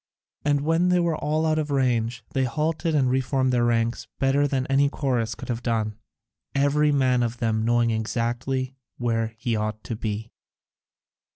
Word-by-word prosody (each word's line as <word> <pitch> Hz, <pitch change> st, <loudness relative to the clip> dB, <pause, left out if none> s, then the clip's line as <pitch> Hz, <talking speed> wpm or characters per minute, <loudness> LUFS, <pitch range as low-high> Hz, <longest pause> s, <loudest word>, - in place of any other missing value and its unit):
And 145 Hz, -1 st, +2 dB
when 165 Hz, +4 st, +2 dB
they 180 Hz, 0 st, +4 dB
were 170 Hz, -2 st, +1 dB
all 155 Hz, +2 st, 0 dB
out 155 Hz, 0 st, +2 dB
of 150 Hz, -1 st, -2 dB
range 120 Hz, -4 st, 0 dB
they 135 Hz, -1 st, +2 dB
halted 155 Hz, +4 st, -1 dB
and 135 Hz, -3 st, +3 dB
reformed 130 Hz, 0 st, +1 dB
their 120 Hz, -1 st, +3 dB
ranks, 115 Hz, 0 st, 0 dB
better 140 Hz, +2 st, +2 dB
than 130 Hz, -2 st, -1 dB
any 140 Hz, +1 st, +3 dB
chorus 120 Hz, -7 st, -1 dB
could -, -, -9 dB
have 120 Hz, -1 st, -2 dB
done, 110 Hz, -3 st, -1 dB, 0.6 s
every 145 Hz, +2 st, +3 dB
man 130 Hz, -3 st, +3 dB
of 120 Hz, 0 st, -1 dB
them 110 Hz, -2 st, 0 dB
knowing 120 Hz, 0 st, +2 dB
exactly 120 Hz, +4 st, -1 dB, 0.2 s
where 115 Hz, -2 st, -1 dB
he 120 Hz, 0 st, -1 dB
ought 110 Hz, 0 st, -3 dB
to 115 Hz, -, -4 dB
be. 110 Hz, +1 st, -4 dB
125 Hz, 170 wpm, -25 LUFS, 115-145 Hz, 0.6 s, they